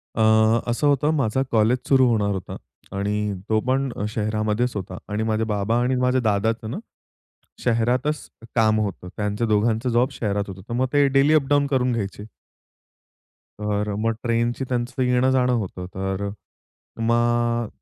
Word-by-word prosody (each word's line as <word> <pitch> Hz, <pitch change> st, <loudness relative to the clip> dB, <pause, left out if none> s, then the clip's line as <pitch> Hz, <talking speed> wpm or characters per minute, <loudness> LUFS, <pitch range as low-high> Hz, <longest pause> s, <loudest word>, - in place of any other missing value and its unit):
अ, -, -, -2 dB, 0.5 s
असं 120 Hz, +5 st, 0 dB
होतं, 145 Hz, +1 st, +3 dB
माझा 130 Hz, 0 st, +1 dB
कॉलेज 115 Hz, +3 st, +3 dB
सुरु 130 Hz, -2 st, +5 dB
होणार 105 Hz, -3 st, +1 dB
होता 95 Hz, -, -6 dB, 0.4 s
आणि 105 Hz, +1 st, -1 dB, 0.2 s
तो 110 Hz, 0 st, +2 dB
पण 135 Hz, +1 st, +1 dB, 0.3 s
शहरामध्येचं 110 Hz, +1 st, -1 dB
होता 95 Hz, -, -7 dB
आणि 105 Hz, +1 st, -1 dB
माझे 110 Hz, 0 st, 0 dB
बाबा 105 Hz, +3 st, 0 dB
आणि 130 Hz, +1 st, +1 dB
माझ्या 125 Hz, 0 st, +2 dB
दादाचं 110 Hz, +1 st, 0 dB
ना -, -, -4 dB, 0.9 s
शहरातचं 125 Hz, +3 st, -1 dB
काम 110 Hz, -2 st, +3 dB
होतं. 95 Hz, -3 st, -4 dB
त्यांचं 105 Hz, +2 st, -1 dB
दोघांचं 110 Hz, +3 st, +1 dB
जॉब 120 Hz, +3 st, +2 dB
शहरात 105 Hz, -4 st, -1 dB
होतं. 95 Hz, 0 st, -8 dB
तर -, -, -5 dB
मग 130 Hz, +2 st, +1 dB
ते 145 Hz, -1 st, +4 dB
डेली 135 Hz, +3 st, +4 dB
अप 140 Hz, -3 st, +3 dB
डाउन 145 Hz, 0 st, +4 dB
करून 130 Hz, -3 st, +1 dB
घ्यायचे. 105 Hz, -2 st, -4 dB, 1.4 s
तर 105 Hz, 0 st, -1 dB
अ, -, -, -3 dB
मग 115 Hz, +1 st, +1 dB
ट्रेनची 120 Hz, +2 st, 0 dB
त्यांचं 125 Hz, +1 st, -2 dB
येणंजाणं 125 Hz, 0 st, +2 dB
होतं, 95 Hz, -5 st, -3 dB
तर 95 Hz, +1 st, -2 dB, 0.7 s
मग 120 Hz, 0 st, +1 dB
115 Hz, 150 wpm, -23 LUFS, 105-125 Hz, 1.4 s, सुरु